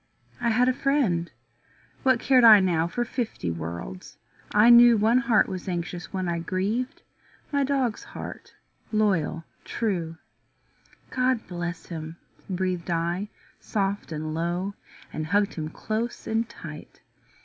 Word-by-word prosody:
I 240 -1 +1
had 245 +3 +3
a 255 - +3
friend; 250 -12 +1 0.7
what 260 -3 +3
cared 255 -1 +4
I 220 -3 +10
now 170 -3 +1
For 240 +7 -2
fifty 225 - -3
worlds? 85 +3 -7 0.3
I 215 +3 +6
knew 240 -1 +8
One 225 +4 +4
heart 235 -3 +3
was 185 -1 -6
anxious 175 0 -4
when 185 -1 -2
I 170 -1 -1
grieved 200 +9 -2 0.5
My 285 -1 +2
dog's 265 -5 0
heart, - - -9 0.4
loyal, 190 -7 +1 0.2
true. 175 -8 -2 0.9
"God 255 -2 +1
bless 175 -1 -5
him," 160 -1 -7 0.3
breathed 185 -2 -2
I 170 +4 -1 0.3
soft 200 -3 -2
and 155 0 -4
low, 175 +4 -2 0.4
And 155 0 -3
hugged 205 +3 +2
him 155 -2 -4
close 220 +7 -4
and 225 +1 -1
tight. 155 -9 -10
195 Hz, 135 wpm, -26 LUFS, 170-235 Hz, 0.9 s, I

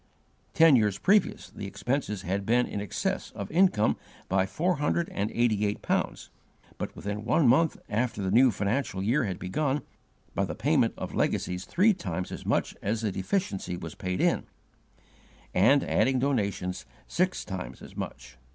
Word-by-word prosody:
Ten 165 -3 +7
years 105 -5 +2
previous, 205 0 +2
the 100 - -6
expenses 105 +1 -2
had 95 +3 -1
been 120 +4 +3
in 100 - -4
excess 105 - -2
of 100 - -5
the - - -11
income 170 - +3 0.3
by 95 0 +2
four 175 - 0
hundred 150 +4 0
and 105 +2 -2
eighty 115 -3 +1
eight 105 0 -1
pounds, - - -1 0.5
but, - - -4
within 105 +1 -4
one 140 +5 +3
month 150 +7 +4
after 115 +1 -1
the 95 -2 -1
new 125 +5 +6
financial 100 -1 -1
year 120 +6 +2
had 95 -3 -3
begun, 135 +9 -1 0.5
by - - 0
the - - -5
payment - - +2
of - - -5
legacies 90 0 -1
three 205 +5 +4
times 170 - -4
as - - -7
much - - 0
as 110 +2 -1
the 110 -3 0
deficiency 95 - -2
was 80 -2 -7
paid 90 0 -3
in; - - +1 1.1
and, 140 0 +5
adding 130 +4 +2
donations, 100 -9 -1 0.2
six 185 +1 0
times 95 -2 -6
as - - -12
much. 60 -1 -7
110 Hz, 170 wpm, -28 LUFS, 95-140 Hz, 1.1 s, Ten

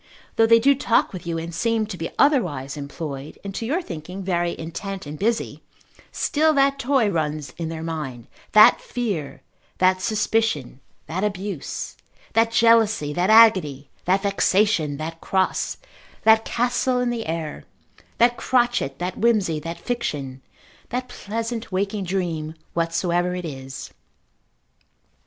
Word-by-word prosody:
Though 225 - +4
they 230 0 +7
do 275 +5 +5
talk 245 -6 +1
with 180 -2 -7
you, 165 -1 -1
and 165 +1 -5
seem 225 +5 +1
to 210 -3 -6
be 165 -1 -4
otherwise 175 - +2
employed, 145 -1 -6
and 200 -1 -6
to 225 +3 -4
your 335 +8 0
thinking 180 - -7
very 175 -2 -1
intent 190 +4 -6
and 150 +1 -7
busy, 225 +3 -1 0.5
still 310 +1 +2
that 275 0 +3
toy 265 -4 +2
runs 155 -3 -2
in 165 -1 -3
their 160 -1 -5
mind, 150 -8 -5 0.3
that 215 0 +8
fear, 185 - -4 0.3
that 185 0 +3
suspicion, 215 - 0 0.3
that 180 +5 -3
abuse, 195 -5 -4 0.4
that 225 +1 +3
jealousy, 225 -9 +4
that 180 +5 +1
agony, 185 -12 +5
that 190 +2 +2
vexation, 195 -6 +2
that 165 +2 -6
cross, 190 -1 0 0.5
that 220 0 +5
castle 245 +1 0
in 250 -1 0
the 230 -5 -4
air, 160 -2 -4 0.5
that 240 +1 +4
crotchet, 240 - +1
that 180 +1 -4
whimsy, 205 -9 +2
that 165 +3 -6
fiction, 140 - -3 0.5
that 250 +1 -3
pleasant 230 0 -4
waking 195 +1 -1
dream, 170 -4 -2 0.2
whatsoever 175 +1 0
it 180 -1 -5
is. 135 -3 -7
190 Hz, 140 wpm, -23 LUFS, 160-230 Hz, 0.5 s, that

